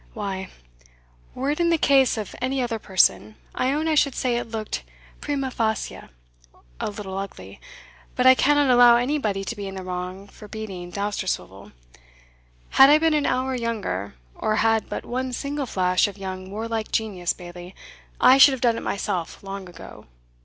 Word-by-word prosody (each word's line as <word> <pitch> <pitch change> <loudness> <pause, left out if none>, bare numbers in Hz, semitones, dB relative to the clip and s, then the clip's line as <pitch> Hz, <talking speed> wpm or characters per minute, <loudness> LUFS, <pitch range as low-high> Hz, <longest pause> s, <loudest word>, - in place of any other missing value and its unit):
"Why, 195 -3 -4 0.9
were 270 +3 -1
it 300 - -3
in 340 0 +2
the 335 - +3
case 270 -5 +3
of 210 -3 -5
any 265 +2 -1
other 240 -3 -2
person, 105 - +2 0.2
I 255 +1 0
own 305 +3 -1
I 320 - +2
should 285 -3 +2
say 250 -2 0
it 240 -1 -3
looked, 220 -1 -4 0.4
prima 275 -3 -2
facie, 220 -3 -2 0.8
a - - -2
little 200 -2 -7
ugly; 195 0 -9 0.5
but 250 - +1
I 260 - +9
cannot 290 0 +3
allow 245 -1 +7
anybody 240 -6 -1
to 235 - -5
be 200 -2 -6
in 195 - -7
the 190 - -6
wrong 185 +2 -6
for 210 +1 -13
beating 195 -5 -7
Dousterswivel 190 - -4 1.1
Had 270 - +10
I 300 - +7
been 320 0 +2
an 295 -2 +1
hour 260 +1 0
younger, 215 - -3 0.2
or 215 - -1
had 225 0 +1
but - - -5
one 255 +1 -3
single 280 +2 -3
flash 185 -2 +2
of 205 -1 -9
your 190 -1 -5
warlike 215 +4 -5
genius, 195 -6 -1
Bailie, 175 +1 -11 0.4
I 265 +1 +6
should 275 0 +8
have 260 - -5
done 235 -3 +2
it - - -5
myself 190 -4 -3
long 195 -1 -7
ago. 170 - -12
220 Hz, 175 wpm, -24 LUFS, 190-260 Hz, 1.1 s, Had